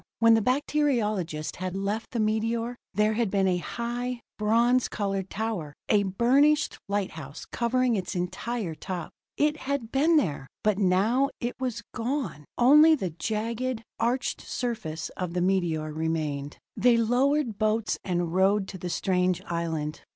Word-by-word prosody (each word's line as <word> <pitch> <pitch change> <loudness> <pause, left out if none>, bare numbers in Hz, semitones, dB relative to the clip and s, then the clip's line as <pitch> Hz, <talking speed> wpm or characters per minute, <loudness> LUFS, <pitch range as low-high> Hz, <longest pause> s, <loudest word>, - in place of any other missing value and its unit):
When 230 0 +6
the 225 - +4
bacteriologist 220 - 0
had 185 0 -4
left 200 +3 -2
the 235 - -3
meteor, 225 +2 0 0.2
there 210 +2 +2
had 225 -1 0
been 195 -1 +2
a 180 -1 +2
high, 240 +4 -4 0.2
bronze 235 +4 +3
colored 195 -2 -2
tower, 200 -9 -3
a 210 - +5
burnished 255 +10 +3
lighthouse, 160 -8 -4
covering 245 0 +1
its 190 0 -3
entire 180 +2 -3
top. 175 +1 -5 0.3
It 300 +1 +2
had 275 -5 -3
been 310 +5 +4
there 145 - 0 0.2
but 215 -2 +2
now 210 +8 +3
it 240 +1 -2
was 255 -3 -3
gone! 230 - -3
Only 300 +6 +7
the 190 - -3
jagged, 225 +6 -2 0.2
arched 245 +2 0
surface 220 -11 -4
of 180 -2 -3
the 180 - +1
meteor 170 -5 0
remained. 155 -3 -2 0.2
They 245 -1 +4
lowered 245 +1 +1
boats 215 0 +1
and 175 -2 -1
rowed 190 +2 +3
to 190 - -8
the 180 - -4
strange 180 0 +1
island. 160 -3 -3
215 Hz, 145 wpm, -27 LUFS, 180-245 Hz, 0.3 s, Only